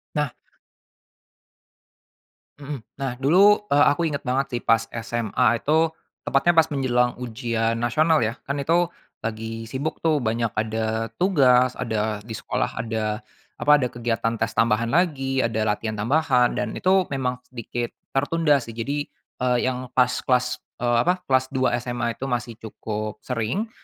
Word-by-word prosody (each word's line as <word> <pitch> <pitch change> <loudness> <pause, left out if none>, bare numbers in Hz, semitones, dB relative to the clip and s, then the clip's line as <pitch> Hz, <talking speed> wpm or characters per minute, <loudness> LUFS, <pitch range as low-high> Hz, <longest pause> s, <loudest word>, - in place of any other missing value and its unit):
Nah. 150 -3 0 2.3
Mhm. 140 -1 -6 0.2
Nah, 135 -2 -2
dulu, 185 +11 +5
eee 145 0 +6
,aku 145 - -1
ingat 145 - -4
banget 135 +2 +1
sih - - -6
pas 115 0 +3 0.2
SMA 120 -1 +1
itu, 160 +2 +3 0.4
tepatnya 140 +6 +3
pas 160 - +6
menjelang 125 -4 +1
ujian 115 -1 -1
nasional 155 +7 +3
ya. 115 +1 0
Kan 140 +1 -3
itu 170 +4 +2 0.3
lagi 115 0 -4
sibuk 140 +5 -4
tuh 160 -2 +3
banyak 115 -1 -1
ada 110 +1 -1
tugas, 130 -9 +4
ada 110 -2 -1
di 110 - -6
sekolah - - -2
ada 110 -1 -2 0.4
apa, 150 - +4
ada 125 -3 0
kegiatan 115 -1 -1
tes 115 - +1
tambahan 115 0 +2
lagi, 135 -4 +1
ada 110 -1 -1
latihan 110 +1 -1
tambahan 125 +2 +2
dan - - -2
itu 185 0 +3
memang 125 -2 -1
sedikit 120 -1 -5 0.2
tertunda 145 +2 +2
sih. 115 -2 -8
Jadi, 140 +5 -2 0.3
eee, 125 -1 +2
yang 130 0 -2
pas 125 -1 +5
kelas, 125 -1 0 0.2
eee, 120 -1 +2
apa, 180 0 +1
kelas 130 0 +3
dua 130 -2 +2
SMA 120 -1 -3
itu 135 - -4
masih 120 -3 -3
cukup 110 -1 -5
sering, 125 - -2
125 Hz, 150 wpm, -24 LUFS, 115-140 Hz, 2.3 s, eee